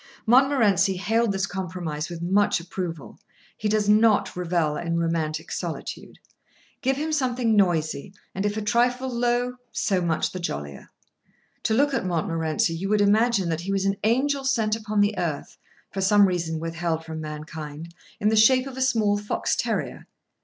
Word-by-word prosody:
Montmorency 225 -7 +4
hailed 225 +4 +1
this 195 0 0
compromise 180 -5 -4
with 170 -1 -6
much 195 +3 +2
approval. 170 -3 -6 0.4
He 210 - -2
does 210 -1 +1
not 215 0 +4
revel 170 -4 0
in 170 +1 -2
romantic 165 -1 -2
solitude. - - -5 0.6
Give 265 +1 +1
him 310 +2 -2
something 250 -6 +1
noisy; 170 -4 +1 0.2
and 195 - -3
if 205 +1 -1
a 215 - -2
trifle 245 +4 +1
low, 245 +1 0
so 190 -3 0
much 165 -2 0
the 185 - -6
jollier. 70 - -5 0.8
To 220 - +2
look 285 +3 +2
at 250 - 0
Montmorency 165 -2 0
you 185 +4 -3
would 210 0 +3
imagine 210 -1 +3
that 165 0 -1
he 190 +3 -4
was 195 0 0
an 195 0 +1
angel 270 +5 +1
sent 225 -5 +1
upon 215 -2 -1
the 205 +1 +2
earth, 160 -5 -4 0.3
for 195 - -3
some 200 +1 +5
reason 165 -3 -2
withheld 165 0 -3
from 160 -1 -6
mankind, 155 +1 -7 0.3
in 210 - +2
the 220 - +2
shape 255 +4 +5
of 265 -1 -8
a - - -3
small 220 -5 +2
fox 205 - -1
terrier. - - -3
195 Hz, 165 wpm, -25 LUFS, 165-225 Hz, 0.8 s, some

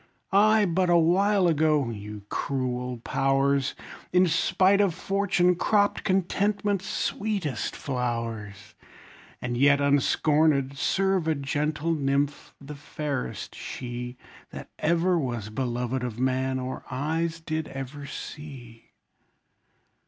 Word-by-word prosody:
I, 215 +2 +5
but 180 0 +1
awhile 180 +3 +4
ago, 155 -5 +2
(you 105 -1 -8
cruel 125 -2 -2
powers!) 135 0 +1 0.4
In 180 +1 +5
spite 185 +4 +3
of 190 -5 +1
fortune, 195 -2 +2
cropped 205 +3 +1
contentment's 195 +1 0
sweetest 200 - -2
flowers, 115 -6 -4 0.7
And 120 0 -2
yet 140 +3 +5
unscornèd, 140 0 +2
serve 190 +4 +1
a 160 - +2
gentle 150 +3 -1
nymph, 140 -1 -1
the 140 +1 -9
fairest 140 -6 -5
she, 125 0 -6 0.3
That - - -9
ever 170 +2 +2
was 120 -7 -3
beloved 125 +1 -2
of 120 -2 -4
man, 130 0 0
or 130 0 -4
eyes 160 +5 -2
did 160 -1 -3
ever 135 +1 -7
see! 130 -9 -9
145 Hz, 110 wpm, -26 LUFS, 130-175 Hz, 0.7 s, I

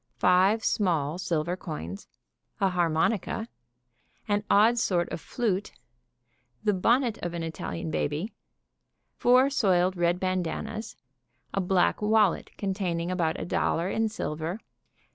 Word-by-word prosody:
Five 190 +5 +4
small 170 -5 +1
silver 170 -1 -1
coins. 100 - -7 0.5
An 195 -1 +2
harmonica. 180 +6 0 0.8
An 205 -1 +1
odd 225 +4 +5
sort 175 -5 +1
of - - -5
flute. 205 -5 -2 0.9
The 210 -1 +2
bonnet 235 +5 +2
of 175 0 -3
an 170 - -3
Italian 165 0 -4
baby. 155 +9 -2 0.8
Four 255 +3 +4
soiled 185 -7 +2
red 175 0 +1
bandannas. 185 +4 -3 0.6
A 195 - +1
black 185 +2 +2
wallet 210 -3 +2
containing 185 -4 -2
about 170 -3 0
a - - -4
dollar 175 +1 0
in 225 0 +1
silver. 165 -1 -4
185 Hz, 120 wpm, -27 LUFS, 170-215 Hz, 0.9 s, odd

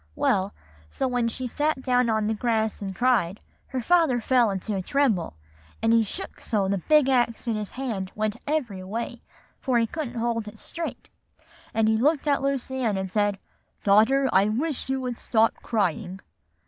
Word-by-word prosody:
Well, 195 0 +1 0.4
so 265 - -1
when 245 -2 0
she 255 +3 -4
sat 290 +2 -1
down 250 -2 +2
on 220 -1 +1
the 220 - +1
grass 220 -1 0
and 195 -1 -4
cried, 220 -7 +2 0.3
her 260 -2 -3
father 320 -2 +3
fell 240 0 +3
into 200 +2 -3
a 190 - -1
tremble, 220 - +1 0.4
and 225 +1 +2
he 230 - +6
shook 225 - -6
so 205 -4 0
the 195 0 0
big 300 - +4
axe 240 -2 +1
in 230 - +1
his 210 -2 -4
hand 225 -8 -4
went 215 0 -1
every 245 -11 -1
way, 230 +4 -5 0.4
for 255 -2 +1
he 230 - +3
couldn't 250 0 -5
hold 230 -2 -1
it 210 +1 -9
straight; 335 +8 -6 0.6
and 220 -1 +2
he 220 0 +3
looked 295 +5 +2
at 280 -2 +2
Lucy 270 -1 -2
Ann, 220 -6 0
and 190 0 -3
he - - -23
said, 205 -2 +1 0.5
'Daughter, 220 +7 +4
I 195 +1 +5
wish 265 +5 -2
you 265 0 0
would 250 -2 -4
stop 225 -1 +2
crying. 190 -3 -1
230 Hz, 185 wpm, -25 LUFS, 210-260 Hz, 0.6 s, he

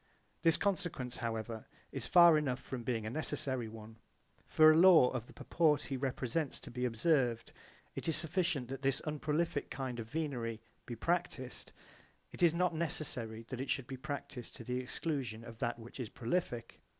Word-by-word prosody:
This 165 -1 +5
consequence 175 -11 -1
however 115 -1 -4 0.2
is - - -4
far 170 -2 +8
enough 140 -4 0
from 130 -2 -6
being 115 -2 -2
a 110 - -3
necessary 135 -4 -1
one. 110 0 -10 0.5
For 155 0 +7
a - - +4
law 165 -6 +7
of 120 -2 -4
the - - -14
purport 150 -3 +2
he 135 - -4
represents 130 +2 -2
to - - -9
be 125 +1 -2
observed, 120 -1 +1 0.4
it - - -5
is 165 - +3
sufficient 165 -6 0
that 135 0 -5
this 135 -1 +1
unprolific 150 0 -1
kind 130 -3 -4
of 110 - -5
venery 125 -7 -2 0.3
be 120 - -4
practised; 130 -2 -2 0.6
it - - -9
is 170 -2 +6
not 175 +1 +1
necessary 130 -8 -3
that 130 -1 -4
it 135 - -5
should 135 - 0
be 130 - -6
practised 130 -2 -6
to - - -8
the 125 +2 -2
exclusion 130 -3 -3
of 115 -1 -11
that 120 -1 -1
which 120 +3 -11
is 120 -4 -4
prolific. 120 -1 -3
130 Hz, 175 wpm, -34 LUFS, 120-155 Hz, 0.6 s, far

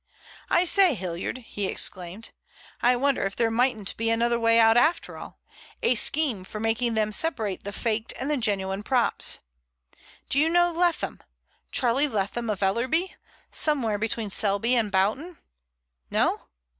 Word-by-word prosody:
"I 350 - +3
say, 365 -4 +5
Hilliard," 180 +2 -4
he 205 -3 -3
exclaimed. 185 +4 -2 0.5
"I 245 +1 +4
wonder 275 +2 +1
if 195 0 -3
there 230 -1 +1
mightn't 225 -4 0
be 225 0 0
another 235 +1 +1
way 230 0 +4
out 225 0 +5
after 310 +8 +2
all—a - - -5
scheme 250 -3 +2
for 215 +3 -8
making 225 +1 0
them 215 -1 0
separate 220 - -1
the 200 - -4
faked 220 +1 -2
and 270 +3 -2
the - - +2
genuine 195 -4 -1
props? 245 +2 +1 0.9
Do 275 - +1
you 310 +2 +3
know 350 +1 +3
Leatham—Charlie 300 -5 -2
Leatham 220 0 -3
of 205 -2 -2
Ellerby, 255 - 0 0.4
somewhere 240 -9 +1
between 220 -1 -2
Selby 205 +4 +1
and 220 -4 0
Boughton? 220 - 0 0.7
No? - - 0
230 Hz, 145 wpm, -25 LUFS, 205-270 Hz, 0.9 s, say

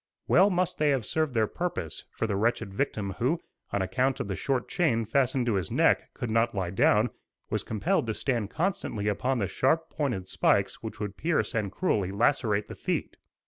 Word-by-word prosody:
Well 195 - +6
must 180 -1 0
they 150 -1 +3
have 135 -6 +1
served 155 -5 -1
their 110 -1 +4
purpose; 130 - -4
for - - -3
the 105 -3 -1
wretched 100 -2 0
victim 105 -4 -1
who, 140 +8 +1 0.3
on 100 - 0
account 125 +8 0
of - - -2
the 95 - -1
short 130 +2 -1
chain 115 -10 +1
fastened 130 +2 +1
to 120 - +1
his 95 -5 -1
neck, - - +2
could 120 - -3
not 115 0 +2
lie 95 -3 -1
down, 105 +4 +3 0.4
was - - 0
compelled 110 +2 0
to 110 - -1
stand 120 -7 -1
constantly 160 - -2
upon 125 +6 0
the 105 - 0
sharp 160 - +1
pointed 120 -12 -2
spikes - - +1
which - - -7
would 105 -1 -4
pierce 165 0 0
and 105 -4 -1
cruelly 100 - 0
lacerate 105 -1 +1
the - - -7
feet. - - -3
115 Hz, 195 wpm, -28 LUFS, 100-140 Hz, 0.4 s, Well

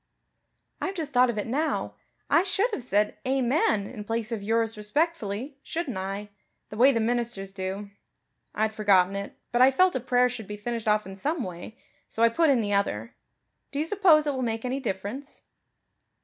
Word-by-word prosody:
"I've 385 - -2
just 310 -5 -4
thought 250 0 +5
of 235 - -2
it 210 - -1
now. 290 +7 -1 0.3
I 330 - +5
should 395 +5 0
have 420 - -3
said, 210 -3 0
'Amen' 255 -5 +1
in 215 -1 -7
place 225 +1 -2
of 225 -3 -2
'yours 225 +2 0
respectfully,' 255 +1 -2
shouldn't 320 - -4
I? 195 +2 -4 0.4
the - - -8
way 255 +5 +6
the 230 - 0
ministers 230 -4 -1
do. 195 +1 -5 0.6
I'd 220 0 0
forgotten 195 -3 +3
it, 200 0 -6
but 240 0 +2
I 260 - +8
felt 365 +6 +3
a - - +1
prayer 250 0 +3
should 235 -4 -6
be 210 - -6
finished 230 +1 -4
off 210 0 +3
in 190 0 -8
some 290 - -2
way, 180 +5 -8 0.3
so 225 - -1
I 230 - +7
put 320 +7 +2
in 260 -4 +4
the 205 -1 -1
other. 115 - -1 0.6
Do 280 - -5
you 300 - +1
suppose 335 -5 +4
it 290 - 0
will 260 - -3
make 225 -1 -2
any 260 +2 -1
difference?" 235 +4 -5
230 Hz, 190 wpm, -27 LUFS, 205-275 Hz, 0.6 s, I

